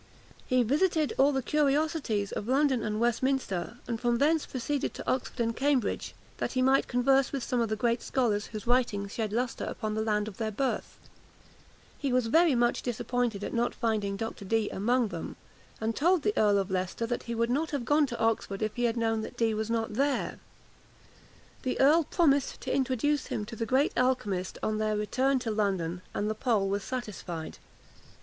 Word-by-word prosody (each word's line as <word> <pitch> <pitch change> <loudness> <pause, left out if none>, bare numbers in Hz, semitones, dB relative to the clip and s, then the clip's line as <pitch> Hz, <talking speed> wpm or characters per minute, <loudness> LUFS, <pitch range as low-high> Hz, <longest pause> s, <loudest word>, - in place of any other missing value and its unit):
He 255 -1 +3
visited 305 - +1
all 275 +2 +6
the 265 -2 -1
curiosities 290 -7 +1
of 210 - -4
London 265 -1 +2
and 215 0 -2
Westminster, 240 -4 0
and 230 -2 -3
from 240 -1 +2
thence 310 +4 +2
proceeded 270 +2 -2
to - - -8
Oxford 255 0 -1
and 230 -1 0
Cambridge, 270 -4 0 0.2
that - - -2
he 255 - +1
might 265 +1 +3
converse 265 +1 +3
with 275 -3 -3
some 245 0 0
of 230 - 0
the 215 - 0
great 235 +2 0
scholars 215 -6 0
whose 215 -3 -7
writings 235 -5 +1
shed 220 -3 -2
lustre 240 +3 -1
upon 215 -2 -3
the 220 - -1
land 210 -1 0
of 205 - -8
their 220 -1 -1
birth. 260 +5 -2 1.0
He 280 -2 -1
was 250 -1 +2
very 330 -4 +5
much 240 0 +2
disappointed 240 -3 -2
at - - -4
not 235 +1 0
finding 210 -3 -1
Dr. 225 -1 -5
Dee 220 +2 0
among 235 +3 +1
them, 170 -4 -6 0.4
and 220 +1 -1
told 345 +2 +3
the 420 - +1
Earl 205 -1 +4
of 195 -1 -1
Leicester 185 +4 -1
that 245 +1 -2
he 235 - -1
would 230 +1 +1
not 305 +5 0
have 280 -5 -3
gone 295 +1 +3
to 235 -2 -6
Oxford 220 -2 0
if 215 - -2
he 245 - +1
had 235 0 0
known 225 -1 +1
that 230 - -8
Dee 230 -2 +2
was 215 +1 -2
not 225 -2 -1
there. 275 +4 0 1.2
The 255 - -2
earl 300 +4 +5
promised 285 -5 +2
to 255 - -2
introduce 270 +2 +1
him 210 - -3
to 225 +2 -8
the 225 +1 -3
great 265 +5 +2
alchymist 210 -8 0
on 215 0 0
their 215 -1 0
return 260 +6 +1
to 230 -3 -2
London, 190 -5 -1
and 205 - 0
the 215 - 0
Pole 220 -3 +1
was 200 0 -1
satisfied. 195 -10 -5
235 Hz, 195 wpm, -29 LUFS, 215-265 Hz, 1.2 s, all